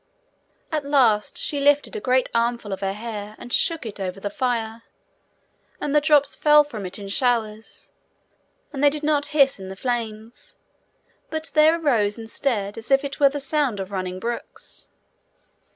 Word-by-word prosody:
At 305 Hz, -2 st, -1 dB
last 250 Hz, -7 st, +2 dB
she 290 Hz, -, -2 dB
lifted 290 Hz, +7 st, +2 dB
a -, -, -2 dB
great 255 Hz, -8 st, +2 dB
armful 235 Hz, -3 st, 0 dB
of 190 Hz, -, -5 dB
her 195 Hz, 0 st, -1 dB
hair, 210 Hz, -1 st, -7 dB
and 245 Hz, -, -8 dB
shook 330 Hz, -6 st, +2 dB
it 210 Hz, -2 st, -7 dB
over 190 Hz, 0 st, -4 dB
the 205 Hz, +1 st, -4 dB
fire, 230 Hz, -3 st, -2 dB, 1.0 s
and 290 Hz, -, -2 dB
the 300 Hz, -, +5 dB
drops 290 Hz, -1 st, +3 dB
fell 300 Hz, 0 st, +6 dB
from 220 Hz, -10 st, -7 dB
it 180 Hz, -, -8 dB
in 200 Hz, -1 st, -8 dB
showers, 220 Hz, 0 st, -1 dB, 0.8 s
and 275 Hz, 0 st, -3 dB
they 290 Hz, -, +7 dB
did 300 Hz, +1 st, -5 dB
not 295 Hz, -1 st, +1 dB
hiss 275 Hz, -6 st, +3 dB
in 190 Hz, 0 st, -8 dB
the 190 Hz, -, -7 dB
flames, 230 Hz, 0 st, -5 dB, 0.7 s
but 315 Hz, -2 st, -3 dB
there 315 Hz, +2 st, +5 dB
arose 225 Hz, -9 st, +1 dB
instead 225 Hz, -2 st, -2 dB
as 225 Hz, -, -11 dB
it 275 Hz, 0 st, +1 dB
were 280 Hz, -1 st, +6 dB
the 290 Hz, +1 st, -4 dB
sound 275 Hz, -6 st, 0 dB
of 195 Hz, +1 st, -5 dB
running 185 Hz, -1 st, -4 dB
brooks. 235 Hz, +3 st, -6 dB
240 Hz, 170 wpm, -23 LUFS, 210-290 Hz, 1.0 s, they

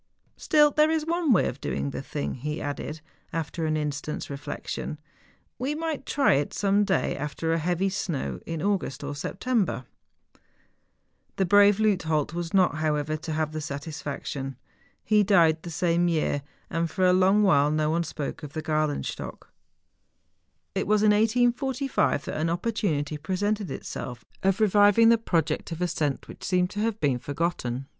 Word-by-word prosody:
Still 295 Hz, -1 st, +4 dB
there 305 Hz, +2 st, +4 dB
is 320 Hz, -1 st, 0 dB
one 335 Hz, -2 st, +1 dB
way 205 Hz, -, +4 dB
of -, -, -6 dB
doing 70 Hz, 0 st, -2 dB
the -, -, -5 dB
thing,' 70 Hz, 0 st, -4 dB
he 150 Hz, +5 st, -4 dB
added, 145 Hz, +2 st, -5 dB, 0.3 s
after 160 Hz, 0 st, -3 dB
an 155 Hz, 0 st, +1 dB
instant's 150 Hz, 0 st, -4 dB
reflection, 140 Hz, +2 st, -5 dB, 0.3 s
' -, -, -38 dB
we 270 Hz, +4 st, -1 dB
might 315 Hz, -3 st, -3 dB
try 280 Hz, -1 st, +3 dB
it 140 Hz, +1 st, 0 dB
some 200 Hz, 0 st, +2 dB
day 195 Hz, -2 st, 0 dB
after 150 Hz, +3 st, -2 dB
a 165 Hz, -, +1 dB
heavy 175 Hz, +4 st, 0 dB
snow, 185 Hz, -7 st, -3 dB
in 165 Hz, -1 st, -3 dB
August 190 Hz, -9 st, -1 dB
or 145 Hz, +1 st, -4 dB
September.' 190 Hz, -, -1 dB, 1.5 s
The 190 Hz, -, +1 dB
brave 205 Hz, +2 st, +6 dB
Leuthold 160 Hz, -8 st, +1 dB
was 170 Hz, -1 st, -4 dB
not, 185 Hz, -6 st, +3 dB
however, 155 Hz, -1 st, 0 dB
to 160 Hz, +1 st, -6 dB
have 155 Hz, 0 st, -1 dB
tlie 155 Hz, 0 st, -4 dB
satisfaction. 140 Hz, -2 st, -5 dB, 0.5 s
He 215 Hz, -1 st, +4 dB
died 170 Hz, -6 st, +4 dB
the 170 Hz, -, -7 dB
same 170 Hz, +1 st, +1 dB
year; 155 Hz, -4 st, 0 dB, 0.3 s
and 165 Hz, 0 st, -1 dB
for 185 Hz, +1 st, +1 dB
a 180 Hz, -, +5 dB
long 190 Hz, +3 st, +4 dB
while 145 Hz, -7 st, +4 dB
no 155 Hz, 0 st, +1 dB
one 170 Hz, +1 st, +1 dB
spoke 150 Hz, -2 st, -5 dB
of 145 Hz, -2 st, -8 dB
the 155 Hz, -, -4 dB
Gralenstock. 155 Hz, -2 st, -2 dB, 1.2 s
It -, -, -1 dB
was 210 Hz, 0 st, +3 dB
in 210 Hz, -, +6 dB
1845 245 Hz, -, +1 dB
that -, -, -4 dB
an 165 Hz, -, +1 dB
opportunity 170 Hz, -6 st, -1 dB
presented 195 Hz, +5 st, -1 dB
itself 125 Hz, -4 st, -6 dB, 0.2 s
of 195 Hz, +1 st, +2 dB
reviving 205 Hz, +2 st, +5 dB
the 230 Hz, -1 st, +5 dB
project 165 Hz, -7 st, -1 dB
of 165 Hz, -, -4 dB
ascent 160 Hz, -5 st, -1 dB
which -, -, -11 dB
seemed 180 Hz, 0 st, +1 dB
to 205 Hz, -, -5 dB
have 220 Hz, 0 st, -1 dB
been 135 Hz, -4 st, +1 dB
forgotten. 140 Hz, -4 st, -2 dB
170 Hz, 165 wpm, -26 LUFS, 150-205 Hz, 1.5 s, brave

